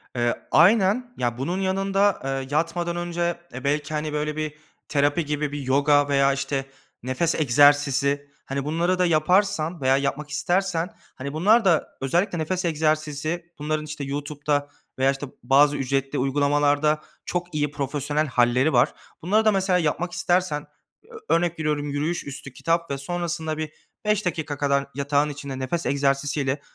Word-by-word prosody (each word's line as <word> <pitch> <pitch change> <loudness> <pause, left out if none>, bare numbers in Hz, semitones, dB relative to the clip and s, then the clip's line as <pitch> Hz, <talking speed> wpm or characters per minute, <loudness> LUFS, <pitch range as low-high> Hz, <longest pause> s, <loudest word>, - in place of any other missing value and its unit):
Eee, 120 -1 +1 0.2
aynen. 210 +7 +4
Ya, 120 -1 -1
bunun 170 +8 -2
yanında, 195 +1 +1
eee, 135 0 -3
yatmadan 170 +3 0
önce, 175 0 -2
eee, 125 - -7
belki, 145 +1 -1
hani, 150 0 -2
böyle, 150 0 -2
bir 155 -1 -3 0.3
terapi 145 +3 +1
gibi, 150 0 -2
bir 145 - -4
yoga 145 +2 +3
veya, 140 -1 +3
işte, 135 0 -2 0.4
nefes 130 +7 0
egzersizi... 145 0 +3 0.2
Hani, 135 0 -3
bunları 170 +4 0
da 180 - +4
yaparsan 170 0 +2
veya 130 +1 +4
yapmak 140 +2 -2
istersen, 175 +3 0 0.3
hani, 140 +2 -6
bunlar 205 +8 +4
da 170 -4 +3
özellikle 175 +7 +1
nefes 180 +4 -1
egzersizi, 155 +1 -1
bunların, 155 +1 -2
işte, 150 -1 -6
YouTube'da 145 +1 -2 0.3
veya, 135 +1 +4
işte, 140 +1 -5 0.2
bazı 145 +3 +4
ücretli 135 +1 -1
uygulamalarda 145 +2 +2 0.2
çok 175 -2 -3
iyi, 150 -1 0
profesyonel 145 +2 -1
hâlleri 125 +3 +2
var. - - +4 0.3
Bunları 210 +6 +2
da 215 - +6
mesela 190 -2 +2
yapmak 170 +2 -1
istersen, 175 -5 0 0.6
ö - - +5
örnek 170 -1 0
veriyorum, 150 -2 -1
yürüyüş 150 +5 -2
üstü 135 -1 -7
kitap 165 +2 -1
ve 140 - -1
sonrasında 165 +1 -3
bir 155 -1 -4 0.3
5 210 -1 +1
dakika 160 -4 -2
kadar 140 -1 +1
yatağın 145 +1 +1
içinde 140 -2 -6
nefes 150 +6 -2
egzersizi 140 +1 +1
ile 140 +1 -1
150 Hz, 155 wpm, -24 LUFS, 140-170 Hz, 0.6 s, da